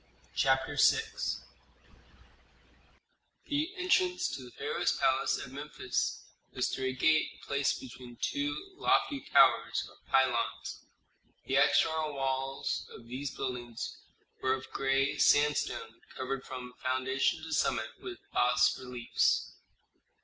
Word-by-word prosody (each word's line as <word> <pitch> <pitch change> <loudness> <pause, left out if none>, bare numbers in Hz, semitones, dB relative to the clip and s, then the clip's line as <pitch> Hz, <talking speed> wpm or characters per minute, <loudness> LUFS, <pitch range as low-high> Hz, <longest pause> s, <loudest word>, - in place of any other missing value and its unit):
CHAPTER 135 +2 +2
VI 450 - +5 2.4
The 295 +3 0
entrance 365 0 +2
to - - -5
the 125 - -10
pharaoh's - - -1
palace - - +2
at - - -8
Memphis - - -3 0.3
was - - 0
through 130 - -3
a 130 - -1
gate 155 +4 +2
placed 140 0 0
between 120 -1 -10
two 145 - -2
lofty 285 -8 +2
towers - - +5
or - - -17
pylons. 125 -3 0 0.6
The - - +1
external 160 -2 +3
walls 135 0 -2
of 115 - -12
these 135 +2 -4
buildings 120 -3 -4 0.5
were 130 - +2
of 130 - -10
gray 135 +1 +1
sandstone 145 -6 +2 0.2
covered 130 +1 -3
from 125 -1 -7
foundation 130 +4 0
to 160 0 -5
summit 110 -6 +1
with 120 - -7 0.2
bas 125 0 +4
reliefs. 125 -2 0
135 Hz, 115 wpm, -31 LUFS, 125-145 Hz, 2.4 s, VI